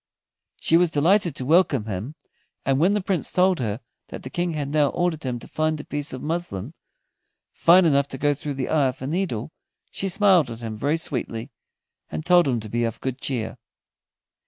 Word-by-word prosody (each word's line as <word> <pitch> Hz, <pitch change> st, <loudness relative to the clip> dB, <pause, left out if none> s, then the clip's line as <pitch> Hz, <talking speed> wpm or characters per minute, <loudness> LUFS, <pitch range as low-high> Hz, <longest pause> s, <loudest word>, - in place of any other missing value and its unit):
She 165 Hz, -, +3 dB
was 175 Hz, 0 st, +3 dB
delighted 170 Hz, +4 st, +2 dB
to 130 Hz, -, -5 dB
welcome 155 Hz, -, +3 dB
him, 110 Hz, +8 st, -5 dB, 0.5 s
and 135 Hz, 0 st, +2 dB
when 185 Hz, +6 st, +3 dB
the 205 Hz, -, -1 dB
Prince 190 Hz, -2 st, 0 dB
told 185 Hz, -1 st, +3 dB
her 110 Hz, -1 st, -2 dB, 0.3 s
that -, -, -9 dB
the 130 Hz, -, -8 dB
King 175 Hz, -1 st, -1 dB
had 145 Hz, -2 st, -3 dB
now 150 Hz, 0 st, +3 dB
ordered 175 Hz, -2 st, -1 dB
him 125 Hz, -2 st, -3 dB
to -, -, -11 dB
find 155 Hz, 0 st, -1 dB
a -, -, -6 dB
piece 145 Hz, +1 st, -4 dB
of 130 Hz, -, -7 dB
muslin 155 Hz, -, -3 dB, 0.8 s
fine 175 Hz, +2 st, +5 dB
enough 140 Hz, -3 st, +3 dB
to 135 Hz, -, -7 dB
go 145 Hz, +2 st, +2 dB
through 145 Hz, 0 st, -5 dB
the 130 Hz, -1 st, -3 dB
eye 150 Hz, -4 st, +3 dB
of 130 Hz, 0 st, -5 dB
a -, -, -2 dB
needle, 155 Hz, -, -2 dB, 0.4 s
she 195 Hz, -, -2 dB
smiled 190 Hz, -, +4 dB
at 115 Hz, 0 st, -8 dB
him 110 Hz, -2 st, -5 dB
very 145 Hz, +8 st, 0 dB
sweetly, 125 Hz, -5 st, -4 dB, 0.6 s
and 155 Hz, -, -5 dB
told 175 Hz, -3 st, +5 dB
him 125 Hz, -3 st, +1 dB
to 110 Hz, -, -8 dB
be 120 Hz, +3 st, -1 dB
of 115 Hz, -1 st, -2 dB
good 130 Hz, 0 st, -4 dB
cheer. 120 Hz, -2 st, -3 dB
145 Hz, 205 wpm, -24 LUFS, 125-170 Hz, 0.8 s, fine